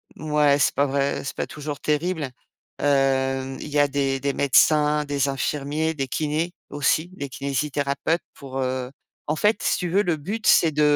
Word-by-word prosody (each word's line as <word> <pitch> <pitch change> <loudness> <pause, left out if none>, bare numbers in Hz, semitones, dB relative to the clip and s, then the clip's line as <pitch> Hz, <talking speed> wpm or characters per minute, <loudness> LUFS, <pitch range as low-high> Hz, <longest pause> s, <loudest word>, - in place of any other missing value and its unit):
mouais 150 -2 +2
c'est - - +2
pas 140 - +3
vrai, 140 0 -1
c'est - - -5
pas - - -3
toujours 150 -1 -6
terrible. 155 -1 -1 0.5
Heu, 135 -1 +1
il - - -7
y 145 0 +1
a 145 - +5
des 135 -1 -1
des 140 +1 -1
médecins, 150 +2 +3
des 140 -1 0
infirmiers, 145 +3 -1
des 135 -2 -2
kinés, 155 +5 -1 0.2
aussi, 145 +3 +1
des 140 -6 -5
kinésithérapeutes 140 +4 -1
pour, 135 -2 -7
heu 130 -1 -2 0.4
en - - +1
fait, 210 +6 +2
si - - +1
tu 180 - -3
veux, 195 +3 +4
le 175 -5 0
but, 205 +9 -4
c'est 165 - +6
de 150 0 0
145 Hz, 180 wpm, -24 LUFS, 135-155 Hz, 0.5 s, c'est